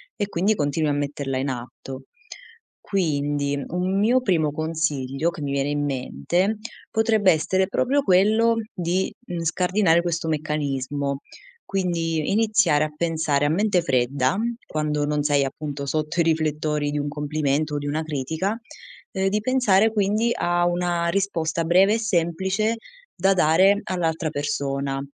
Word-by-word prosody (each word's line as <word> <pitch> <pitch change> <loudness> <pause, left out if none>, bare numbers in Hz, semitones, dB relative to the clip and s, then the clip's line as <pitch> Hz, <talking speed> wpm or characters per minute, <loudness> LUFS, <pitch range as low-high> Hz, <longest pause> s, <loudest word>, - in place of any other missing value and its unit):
e 205 - -2
quindi 200 +3 +1
continui 150 -1 0
a - - +1
metterla 140 -2 -2
in 135 +2 -1
atto. 130 +1 -7 0.8
Quindi 145 -6 -1
un 185 +3 -1
mio 240 +5 +3
primo 165 -10 +1
consiglio, 155 -2 -1
che 170 -2 -8
mi 140 -1 -3
viene 140 0 0
in 145 0 -1
mente, 170 +9 -1 0.3
potrebbe 220 -4 +3
essere 185 +4 +1
proprio 260 +8 +1
quello 220 +2 +4 0.2
di, 180 +2 -1
mhmm, 175 -2 -4
scardinare 180 +1 +2
questo 170 -1 -2
meccanismo, 145 -2 -2 0.5
quindi 165 -5 -1
iniziare 210 -8 +3
a 155 - -6
pensare 160 -3 0
a - - +2
mente 190 +2 +2
fredda, 130 +2 +1 0.3
quando 150 -1 -1
non 150 0 0
sei 145 -1 +3
appunto 140 +1 -5
sotto 155 +4 -1
i - - +4
riflettori 155 -2 0
di 150 - -2
un 145 0 -2
complimento 150 0 -1
o - - 0
di 145 0 -4
una 155 +2 -1
critica, 160 - -2 0.5
ehm, 190 -1 0
di 210 +2 0
pensare 220 -4 +3
quindi 215 +2 +1
a 175 0 +1
una 175 -1 0
risposta 170 -4 -1
breve 190 +5 +4
e - - -1
semplice 190 +2 0 0.4
da 195 +2 +2
dare 190 +4 +4
all'altra 165 -3 -1
persona, 140 -2 -2
160 Hz, 145 wpm, -23 LUFS, 145-190 Hz, 0.8 s, quello